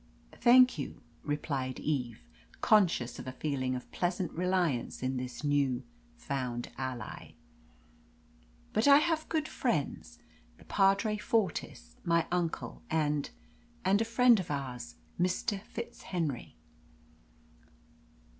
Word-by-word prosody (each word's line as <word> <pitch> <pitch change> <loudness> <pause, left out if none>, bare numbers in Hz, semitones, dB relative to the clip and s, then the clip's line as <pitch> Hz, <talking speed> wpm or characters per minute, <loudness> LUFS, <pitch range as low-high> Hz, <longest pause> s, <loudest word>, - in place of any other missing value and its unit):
"Thank 250 -4 +6
you," 140 - -5 0.2
replied 140 -3 -2
Eve, 125 -7 -2 0.4
conscious 175 - +3
of - - -8
a - - -3
feeling 130 -2 -1
of 125 - -7
pleasant 175 -1 -1
reliance 175 -9 0
in 130 0 0
this 125 +2 -5
new 140 -4 +1 0.3
found 130 - -3
ally. 130 -4 -6 1.4
"But 220 +5 +2
I 280 0 +9
have 315 +1 +1
good 310 -2 0
friends - - -2 0.4
the - - -17
Padre 200 +2 +3
Fortis, 190 - -2
my 170 -1 +2
uncle, 175 -2 -2
and 150 -2 0 0.6
a 200 +4 +4
friend 235 0 +5
of 185 - -5
ours, 125 - -4 0.2
Mr. 185 +3 0
FitzHenry." 175 - -4
160 Hz, 110 wpm, -31 LUFS, 130-205 Hz, 1.4 s, I